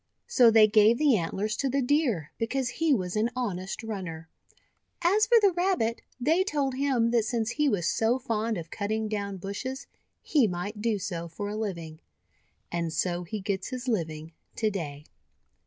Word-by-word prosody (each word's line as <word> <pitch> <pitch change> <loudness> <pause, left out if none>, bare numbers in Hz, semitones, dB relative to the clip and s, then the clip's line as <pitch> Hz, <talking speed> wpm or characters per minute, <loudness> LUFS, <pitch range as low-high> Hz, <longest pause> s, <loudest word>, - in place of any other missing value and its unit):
So 250 - +5
they 220 -1 +7
gave 215 +2 +5
the 290 -4 +4
antlers 200 +4 -1
to 275 - 0
the 275 +1 +1
Deer 245 - +1
because 245 +2 -1
he 320 +5 0
was 185 -8 0
an 215 +2 +2
honest 195 -5 -3
runner. 180 -7 -6 0.7
As 410 +5 +4
for 470 - +6
the 405 -3 +4
Rabbit, 350 -11 0 0.2
they 320 +9 +3
told 285 -8 -1
him 255 -4 +1
that 235 -2 +3
since 225 0 -1
he 300 +1 +1
was 190 -8 0
so 225 +3 +2
fond 230 -4 -1
of 165 -1 -7
cutting 215 +2 -2
down 200 -2 -3
bushes, 205 +8 -5 0.4
he 280 -8 +3
might 200 +4 -4
do 225 -1 +1
so 175 -4 -4
for 205 +5 -5
a 210 - -4
living 170 -7 -4 0.4
— 70 - -42
and 170 -1 -2
so 175 +1 -1
he 215 +5 -4
gets 190 -1 -2
his 255 0 -6
living 160 -8 -2 0.2
to 215 -2 0
day. 150 -6 -5
220 Hz, 180 wpm, -28 LUFS, 185-255 Hz, 0.7 s, they